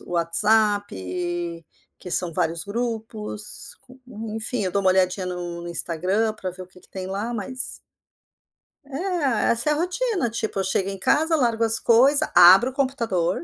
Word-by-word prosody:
o -, -, -15 dB
WhatsApp, 175 Hz, -, -1 dB, 0.3 s
que 180 Hz, -, -10 dB
são 175 Hz, -1 st, +2 dB
vários 165 Hz, +1 st, -2 dB
grupos, 220 Hz, -1 st, -2 dB, 0.3 s
en 220 Hz, -2 st, -7 dB
enfim, 225 Hz, 0 st, -1 dB
eu 185 Hz, -, -3 dB
dou 200 Hz, -, +1 dB
uma 190 Hz, -, +3 dB
olhadinha 185 Hz, 0 st, 0 dB
no 175 Hz, -1 st, -6 dB
no 175 Hz, -, -7 dB
Instagram 180 Hz, +6 st, -1 dB
pra 185 Hz, -3 st, -6 dB
ver 185 Hz, +1 st, -10 dB
o -, -, -12 dB
que 185 Hz, 0 st, -19 dB
que -, -, -19 dB
tem 185 Hz, -1 st, -7 dB
lá, 205 Hz, +5 st, -4 dB
mas 255 Hz, +4 st, -5 dB, 1.3 s
É, 290 Hz, -, -1 dB
essa 235 Hz, +6 st, +1 dB
é -, -, +3 dB
a -, -, 0 dB
rotina. 360 Hz, -, -1 dB
Tipo, 220 Hz, -3 st, -3 dB
eu -, -, -1 dB
chego 190 Hz, 0 st, -1 dB
em 195 Hz, -1 st, -5 dB
casa, 320 Hz, -, +2 dB
largo 230 Hz, -4 st, 0 dB
as 225 Hz, 0 st, +7 dB
coisa, 275 Hz, +6 st, +3 dB
abro 190 Hz, +8 st, +7 dB
o -, -, -13 dB
computador, 230 Hz, -11 st, -1 dB
210 Hz, 175 wpm, -23 LUFS, 180-240 Hz, 1.3 s, as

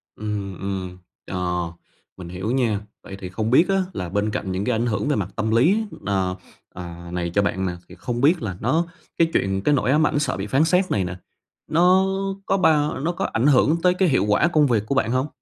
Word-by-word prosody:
Ừm, 100 Hz, -3 st, -4 dB
ừm, 95 Hz, -2 st, -4 dB, 0.3 s
ờ, 90 Hz, -2 st, -2 dB, 0.5 s
mình 85 Hz, -2 st, -8 dB
hiểu 95 Hz, +6 st, -3 dB
nha. 120 Hz, -6 st, +1 dB, 0.2 s
Vậy 95 Hz, -, -8 dB
thì 90 Hz, -, -6 dB
không 110 Hz, +5 st, -2 dB
biết 170 Hz, +8 st, +5 dB
á 195 Hz, -, +3 dB, 0.2 s
là 90 Hz, -2 st, -4 dB
bên 105 Hz, +3 st, 0 dB
cạnh 95 Hz, -2 st, -3 dB
những 95 Hz, +2 st, -2 dB
cái 125 Hz, -2 st, +1 dB
ảnh 115 Hz, +2 st, 0 dB
hưởng 110 Hz, +1 st, -1 dB
về 145 Hz, -, +2 dB
mặt 100 Hz, -2 st, -2 dB
tâm 110 Hz, +1 st, -1 dB
lý, 175 Hz, -, +3 dB, 0.2 s
ờ, 95 Hz, -2 st, 0 dB, 0.4 s
à, 85 Hz, -1 st, -8 dB
này 90 Hz, -1 st, -2 dB
cho 100 Hz, -, +3 dB
bạn 95 Hz, -1 st, -1 dB
nè, 90 Hz, -, -1 dB, 0.2 s
thì -, -, -12 dB
không 120 Hz, -1 st, -4 dB
biết 160 Hz, +3 st, +4 dB
là 95 Hz, -5 st, -4 dB
nó 160 Hz, +9 st, +1 dB, 0.3 s
cái 165 Hz, -, +4 dB
chuyện 95 Hz, 0 st, 0 dB
cái 145 Hz, -, +2 dB
nỗi 130 Hz, -1 st, +1 dB
ám 150 Hz, +1 st, +4 dB
ảnh 145 Hz, -, 0 dB
sợ 145 Hz, -, -1 dB
bị 100 Hz, +2 st, -4 dB
phán 135 Hz, +7 st, +3 dB
xét 180 Hz, +3 st, +2 dB
này 95 Hz, -, +1 dB
nè, 90 Hz, +1 st, -5 dB, 0.5 s
nó 180 Hz, +4 st, +4 dB, 0.4 s
có 195 Hz, -, +1 dB
bao 150 Hz, -6 st, +2 dB
nó 165 Hz, +5 st, 0 dB
có 175 Hz, -, -3 dB
ảnh 115 Hz, +4 st, -1 dB
hưởng 150 Hz, +4 st, +4 dB
tới 180 Hz, 0 st, +5 dB
cái 180 Hz, -2 st, +2 dB
hiệu 130 Hz, -6 st, +2 dB
quả 105 Hz, +11 st, +3 dB
công 155 Hz, -4 st, +3 dB
việc 110 Hz, -4 st, +1 dB
của 140 Hz, -, -2 dB
bạn 120 Hz, -3 st, +1 dB
hông? 130 Hz, +3 st, 0 dB
110 Hz, 235 wpm, -23 LUFS, 95-150 Hz, 0.5 s, biết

